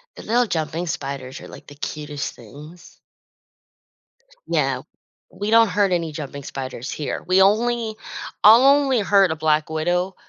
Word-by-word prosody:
The - - -10
little 240 +2 +2
jumping 165 -1 -3
spiders 135 -3 -5
are, - - -11
like, - - -13
the 145 - -12
cutest 150 0 -5
things. 155 +5 -14 1.5
No. - - -1 0.5
We 205 +1 -4
don't 230 -1 +6
hurt 200 +1 +1
any 170 -3 -1
jumping 140 -2 -7
spiders 130 -1 -6
here. 150 - -4
We 185 +1 +4
only 220 +2 +2 0.5
I'll 225 +5 +8
only 275 -3 +4
hurt 195 -3 +3
a - - -1
black 155 0 +1
widow 175 +4 -1
175 Hz, 145 wpm, -22 LUFS, 150-210 Hz, 1.5 s, I'll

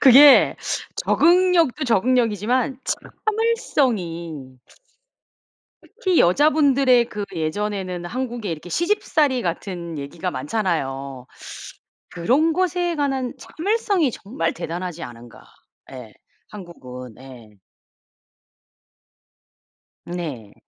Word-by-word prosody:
그게 275 +2 +8 0.4
적응력도 340 -5 +3
적응력이지만 245 +2 +1
참을성이 190 - -2 1.2
특히 380 -7 -1
여자분들의 275 - +4
그 210 -1 -4
예전에는 185 +2 -3
한국에 240 -1 -4
이렇게 165 +2 -6
시집살이 315 - +1
같은 170 -2 -4
얘기가 160 +6 -4
많잖아요. 140 - -3 0.8
그런 265 - +2
것에 355 0 0
관한 270 -4 -1
참을성이 395 - 0
정말 195 -7 -3
대단하지 175 0 -5
않은가. 120 -2 -10 0.5
예 125 -5 -10 0.4
한국은 125 - -10
예. 120 -5 -14 2.5
네. 150 - -6
210 Hz, 210 characters per minute, -22 LUFS, -, 2.5 s, 그게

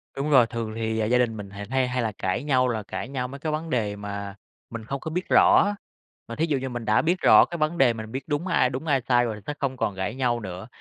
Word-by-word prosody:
Đúng 140 +2 -2
rồi, 130 -5 +6
thường 115 -2 -4
thì 110 0 -2
gia 125 - +4
đình 120 -3 +1
mình 100 -1 -7
hay 110 +6 -2
hay 125 0 -1
là 115 -2 -1
cãi 95 +7 -2
nhau 130 -3 +2
là 110 -3 -2
cãi 105 - -5
nhau 130 -2 -3
mấy 140 +2 -9
cái 155 - -3
vấn 155 +2 -3
đề 110 -7 -1
mà 100 -1 -6 0.3
mình 115 -1 -7
không 135 +4 -4
có 160 - -6
biết 180 +3 -3
rõ, 205 0 +5 0.5
mà 115 - -6
thí 160 - +1
dụ 150 -4 0
như 130 0 -4
mình 120 -2 -5
đã 105 +2 +3
biết 175 +2 +1
rõ - - +7
cái 170 - -6
vấn 155 +2 0
đề, 130 -5 +4
mình 110 -1 -8
biết 130 +2 -4
đúng 155 +4 -2
ai 145 -7 +3
đúng, 130 +5 -5
ai 135 -4 +2
sai 120 0 +2
rồi 110 -2 -5
sẽ 150 - -2
không 135 -2 -2
còn 105 - -1
cãi 100 +5 -3
nhau 125 -3 0
nữa. 95 -1 -7
125 Hz, 280 wpm, -25 LUFS, 110-140 Hz, 0.5 s, rõ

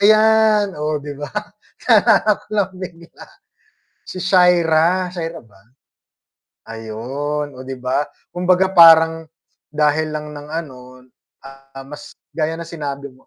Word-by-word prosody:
Ayan, 215 -1 +4
oh, 150 0 -2
'di 145 0 -8
ba, 145 +1 -8 0.6
naalala 220 -2 +4
ko - - -22
lang 200 -2 0
bigla 175 -2 -11 0.8
si 185 - -7
Shaira, 180 -1 +3
Shaira 165 -2 -6
ba? 105 -4 -23 1.1
Ayun, 130 +6 -5
oh, 130 - -10
'di 130 -1 -8
ba, 130 +3 -1 0.2
kumbaga 180 +1 +1
parang 165 -2 +6 0.5
dahil 150 +1 0
lang 150 0 -5
ng 145 0 -10
ano, 130 -6 -8 0.4
ah, 135 0 -13
mas 150 +1 -11 0.2
gaya 160 0 -1
ng 165 - -8
sinabi 140 -4 -6
mo 130 0 -22
155 Hz, 125 wpm, -19 LUFS, 140-180 Hz, 1.1 s, parang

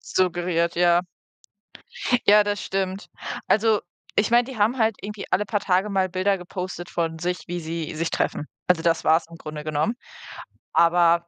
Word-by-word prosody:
Suggeriert, 175 -2 +1
ja. 175 0 +4 1.3
Ja, 210 +1 +7
das 205 -1 -2
stimmt. 190 0 -2 0.4
Also, 220 0 +3 0.4
ich 205 - +3
meine, 240 +1 +5
die 260 0 -8
haben 225 +5 +2
halt 220 -1 +2
irgendwie 210 0 -6
alle 205 - +2
paar 205 0 -1
Tage 190 +2 +1
mal 190 -1 +1
Bilder 190 +2 +1
gepostet 180 0 -6
von 165 -1 -2
sich, 180 +2 -2
wie 175 0 -3
sie 160 -1 -4
sich 165 +1 -1
treffen. 150 - -1 0.2
Also, 180 -3 +3
das 165 -1 +2
war's 160 +2 +4
im 170 - -11
Grunde 155 -2 -7
genommen. 155 +9 0 0.8
Aber 170 0 +4
180 Hz, 165 wpm, -24 LUFS, 170-205 Hz, 1.3 s, Ja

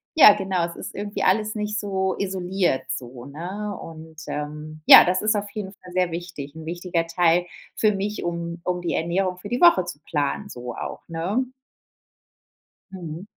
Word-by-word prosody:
ja, 265 -10 +10
genau, 190 -4 -1
es 170 0 -7
ist - - -7
irgendwie 205 +1 -3
alles 215 +3 +2
nicht 210 0 -2
so 190 -2 -1
isoliert 185 -5 0
so, 125 -1 -6
ne? 185 +8 -5
Und, 160 -1 -11
ähm, 150 +1 -6
ja, - - +11
das 185 +1 +1
ist 215 0 +2
auf 205 0 -3
jeden 205 -3 -5
Fall 180 -1 -14
sehr 180 -2 +1
wichtig, 165 -4 -6
'n 160 - -9
wichtiger 170 0 -2
Teil 175 +1 +3 0.3
für 215 -1 +3
mich, 205 +2 -3
um 170 0 -4
um 180 -1 -1
die 175 - -2
Ernährung 180 +2 0
für 205 - -9
die 245 +5 -2
Woche 340 - +7
zu 150 -4 -7
planen, 150 +7 -2
so 120 -1 -7
auch, - - -5
ne? 185 +10 -1 1.5
Mhm. 170 0 -7
180 Hz, 175 wpm, -24 LUFS, 165-200 Hz, 1.5 s, ja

